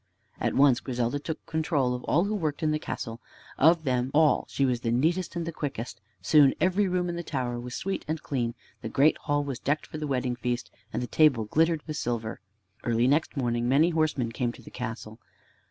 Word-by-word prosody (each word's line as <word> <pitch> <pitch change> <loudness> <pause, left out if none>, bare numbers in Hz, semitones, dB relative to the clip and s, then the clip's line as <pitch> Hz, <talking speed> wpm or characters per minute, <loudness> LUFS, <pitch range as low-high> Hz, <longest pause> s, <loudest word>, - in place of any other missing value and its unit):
At - - 0
once 135 -3 +5
Griselda 125 +1 -2
took 155 +2 -6
control 150 -5 0
of 125 - -5
all 170 - +3
who 205 +2 -1
worked 160 -7 -2
in 155 - +2
the 155 - 0
castle. 115 -5 -5 0.4
Of 160 +2 +5
them 125 -2 0
all 155 -1 +4
she 140 - +1
was 125 -2 0
the 115 - -1
neatest 165 +10 +1
and 170 -1 -2
the 170 - -3
quickest. 125 -7 -5 0.2
Soon 145 +5 +5
every 190 +2 +2
room 180 -1 0
in 175 - -3
the - - -2
tower 125 -7 -3
was 125 +1 -6
sweet 195 +1 -3
and 160 +1 -2
clean. 120 -5 -2 0.3
The 110 - -4
great 140 +7 +3
hall 145 -1 0
was 135 -3 -4
decked 145 +3 -1
for 155 - -7
the 150 - -3
wedding 125 -2 -1
feast, 120 0 -3 0.2
and - - -2
the - - -1
table 135 -4 +4
glittered 160 +6 +2
with 155 -1 -4
silver. 115 -2 -3 0.4
Early 120 +1 +2
next 150 +2 +1
morning 120 -2 0
many 155 +6 +4
horsemen 155 -7 0
came 120 +1 -1
to - - -14
the - - -12
castle. 110 -2 -6
140 Hz, 215 wpm, -27 LUFS, 120-155 Hz, 0.4 s, once